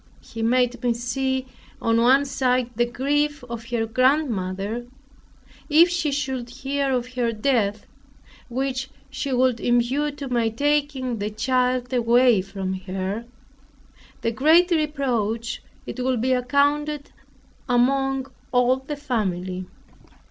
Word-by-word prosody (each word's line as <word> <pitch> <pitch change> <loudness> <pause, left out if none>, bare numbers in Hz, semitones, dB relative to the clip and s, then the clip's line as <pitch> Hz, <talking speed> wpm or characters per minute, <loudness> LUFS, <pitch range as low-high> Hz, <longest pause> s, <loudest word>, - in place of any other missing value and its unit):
He 225 - -8
made 245 +1 +2
me 240 -1 +2
see, 260 +2 -1 0.3
on 230 0 +2
one 265 +4 +5
side 255 -2 0
the 240 +1 +2
grief 290 +3 0
of 235 -1 -6
her 230 -1 -1
grandmother, 225 -4 0 0.8
if 325 +4 +6
she 340 -4 0
should 265 -4 -2
hear 270 +2 -2
of 250 0 -2
her 240 -2 0
death, 215 -3 0 0.6
which 265 +1 -2 0.2
she 280 - -3
would 255 -2 +2
impute 260 +6 +1
to 280 -2 -5
my 240 -3 +1
taking 280 -1 0
the 205 +1 -2
child 250 +3 0
away 240 -2 +4
from 195 0 -4
her; 190 +4 -3 1.0
the 230 - 0
great 320 +9 +4
reproach, 245 -8 -1 0.2
it - - -7
would 255 -2 +1
be 260 +3 +2
accounted 285 +3 +1 0.6
among 270 +2 +2 0.3
all 250 +1 +3
the 270 +3 -6
family. 185 -9 -2
250 Hz, 125 wpm, -23 LUFS, 230-275 Hz, 1.0 s, if